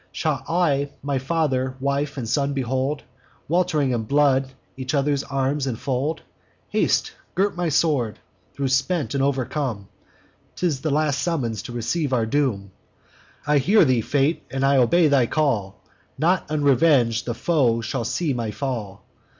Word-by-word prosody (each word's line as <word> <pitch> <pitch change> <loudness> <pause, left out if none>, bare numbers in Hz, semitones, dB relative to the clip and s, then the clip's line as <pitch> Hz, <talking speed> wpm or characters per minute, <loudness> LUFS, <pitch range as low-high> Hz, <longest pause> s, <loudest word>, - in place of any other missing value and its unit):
Shall 150 -7 -2
I 150 -5 +1
my 140 -1 -1
father, 130 -3 -1
wife, 140 +2 -1
and 120 -4 -4
son 140 +4 0
behold, 130 +2 -1 0.4
Welt'ring 160 -5 +1
in 115 -3 -1
blood, 135 0 +2 0.2
each 130 +2 -3
other's 140 0 +1
arms 135 +1 -1
infold? 130 +5 -2 0.5
Haste! - - +1 0.2
gird 195 +2 +1
my 175 -1 -1
sword, 140 -7 +1 0.4
tho' 140 - -1
spent 135 +5 0
and 140 - 0
overcome: 130 -5 -2 0.7
'Tis 160 -7 -1
the 155 - -1
last 145 -2 +1
summons 125 - -1
to 110 - -8
receive 130 +5 -2
our 115 -3 +2
doom. 110 -6 -1 0.7
I 145 0 +3
hear 200 +10 +4
thee, 125 -3 +2
Fate; 145 +7 +1
and 135 0 -1
I 140 0 +4
obey 160 +7 +4
thy 135 -5 +3
call! 115 -12 -1 0.4
Not 175 +4 +1
unreveng'd 140 -5 +3
the 120 - -3
foe 125 -7 +1
shall 120 +2 -3
see 150 +6 -1
my 115 -3 -2
fall. 105 -6 -5
140 Hz, 150 wpm, -23 LUFS, 125-150 Hz, 0.7 s, hear